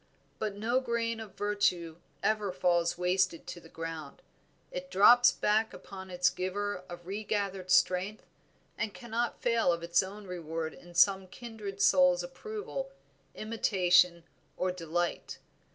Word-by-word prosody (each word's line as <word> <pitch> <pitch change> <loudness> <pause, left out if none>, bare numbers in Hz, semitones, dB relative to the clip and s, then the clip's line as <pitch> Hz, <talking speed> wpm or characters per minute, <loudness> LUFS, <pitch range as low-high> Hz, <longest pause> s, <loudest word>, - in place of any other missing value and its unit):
But 210 -2 -2
no 230 +5 +1
grain 230 -2 -2
of 215 -4 -9
virtue 185 -6 0 0.3
ever 210 -2 +1
falls 175 -2 +1
wasted 180 -1 +1
to 175 - -7
the 165 - -16
ground; 165 -3 -7 0.5
it 180 0 -6
drops 240 +6 +7
back 215 +1 +1
upon 190 -1 -10
its 180 -1 +2
giver 190 +1 -3
a 175 - -6
regathered 195 0 -3
strength, 185 +4 +2 0.5
and 210 - -2
cannot 235 0 -3
fail 230 -6 +3
of 170 0 -2
its 170 0 +3
reward 180 -5 -5
in 175 0 -15
some 190 +1 +4
kindred 210 -1 -8
soul's 270 -1 +5
approval, - - -6 0.5
imitation, 180 -5 +3 0.3
or 185 0 0
delight. 175 0 -3
190 Hz, 130 wpm, -30 LUFS, 175-220 Hz, 0.5 s, drops